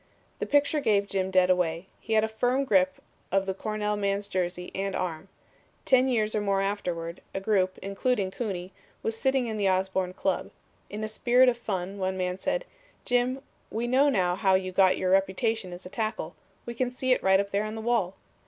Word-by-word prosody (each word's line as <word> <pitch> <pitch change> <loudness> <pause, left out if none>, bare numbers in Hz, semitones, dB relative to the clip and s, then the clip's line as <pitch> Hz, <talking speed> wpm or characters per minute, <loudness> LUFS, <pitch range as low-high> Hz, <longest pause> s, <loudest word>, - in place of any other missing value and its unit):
The - - -2
picture 290 +1 +3
gave 205 -7 +2
Jim 190 -2 -1
dead 185 -1 +4
away. 175 -1 0
He 225 - -4
had 215 0 +4
a - - +2
firm 245 +5 0
grip 185 -5 +3 0.4
of 195 0 +2
the 190 - -1
Cornell 210 +1 -2
man's 200 0 -1
jersey 180 -2 -3
and 195 0 -2
arm. 175 0 -3 0.6
Ten 260 0 +4
years 215 -4 +1
or 215 - 0
more 200 -1 +1
afterward, 180 -4 -3
a - - 0
group, 190 -2 +1
including 195 0 0
Cooney, 190 -5 -4 0.3
was 225 - -1
sitting 265 +2 +1
in 220 -2 -3
the 200 -2 +2
Osborn 190 -1 0
Club. 190 0 -1 0.4
In 210 +2 -5
a - - -1
spirit 245 +4 +4
of 240 - -1
fun 190 -3 -3
one 190 0 -1
man 180 0 -2
said, - - -1 0.4
'Jim, 250 +2 +1 0.3
we 225 +2 -2
know 265 +4 +4
now 185 -8 +2
how 190 -1 +3
you 185 0 -1
got 185 0 +4
your 185 - 0
reputation 195 +1 +1
as 175 +1 -9
a - - -7
tackle. 215 -5 -3 0.3
We 235 - -5
can 245 +1 -1
see 255 +1 -2
it - - -1
right 190 0 +4
up 200 0 -2
there 200 +1 +1
on 215 +1 -4
the - - -5
wall.' 220 -5 0
200 Hz, 205 wpm, -27 LUFS, 185-225 Hz, 0.6 s, dead